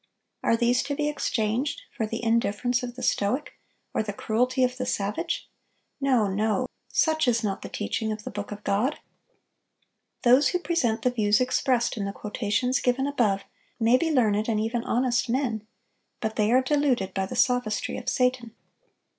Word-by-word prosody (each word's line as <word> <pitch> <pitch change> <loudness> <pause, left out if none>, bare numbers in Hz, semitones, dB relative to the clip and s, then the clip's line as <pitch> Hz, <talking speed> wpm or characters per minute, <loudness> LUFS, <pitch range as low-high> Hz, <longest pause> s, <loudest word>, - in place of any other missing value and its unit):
Are 230 - +2
these 240 +1 +3
to 285 0 -2
be 295 0 0
exchanged 260 - -1
for 220 - -1
the 225 +2 -5
indifference 235 +2 +1
of 245 -1 -6
the 255 - -7
stoic, 225 +9 0 0.4
or - - +1
the 210 -1 -4
cruelty 250 +5 +1
of 250 0 0
the 255 - -2
savage? 215 +11 -2 0.5
No, 260 -6 +3
no; 215 +5 0 0.2
such 315 -3 +2
is 235 -1 +2
not 200 -2 -2
the - - -7
teaching 220 +1 -2
of 215 0 -5
the 255 - -6
Book 205 -1 -6
of 205 0 -7
God. 215 +9 +1 1.3
Those 255 +3 +6
who 360 - +1
present 245 -11 0
the 250 - +3
views 210 -3 +2
expressed 255 -1 +1
in 200 - -2
the 200 - -3
quotations 220 +5 -1
given 255 +2 +1
above 220 -9 +1 0.4
may 230 +2 +4
be 325 +5 +1
learned 220 -5 +2
and 215 -2 +1
even 230 +2 -1
honest 245 0 +1
men; 235 -4 -1 0.5
but 220 -1 -3
they 215 0 +2
are 255 +1 +4
deluded 255 -9 +1
by 190 -1 -1
the - - -6
sophistry 245 -4 +1
of - - -3
Satan. 250 -3 0
240 Hz, 175 wpm, -26 LUFS, 215-255 Hz, 1.3 s, Those